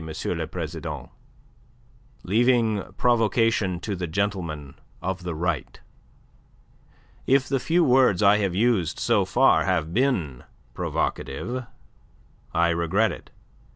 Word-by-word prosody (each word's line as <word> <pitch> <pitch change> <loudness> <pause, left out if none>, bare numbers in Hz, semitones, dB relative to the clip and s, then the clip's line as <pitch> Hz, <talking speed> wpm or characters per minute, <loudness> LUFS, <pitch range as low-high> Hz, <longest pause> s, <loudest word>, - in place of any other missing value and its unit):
le - - -2
President, - - -6 1.1
leaving 115 0 +2 0.2
provocation 115 -5 +2
to 100 +2 -4
the 90 -1 -4
gentlemen 85 -6 -3 0.3
of 95 0 -3
the 90 -2 -4
Right. 85 -3 -3 1.5
If 135 0 +3
the 135 0 0
few 170 +6 +2
words 125 - +4
I 100 +1 +6
have 100 -4 -1
used 105 -6 +1
so - - +2
far - - +3
have 80 +1 0
been 95 - 0 0.3
provocative, 125 +1 -3 0.8
I 85 0 +2
regret 85 +6 +1
it. - - -10
100 Hz, 110 wpm, -24 LUFS, 85-120 Hz, 1.5 s, I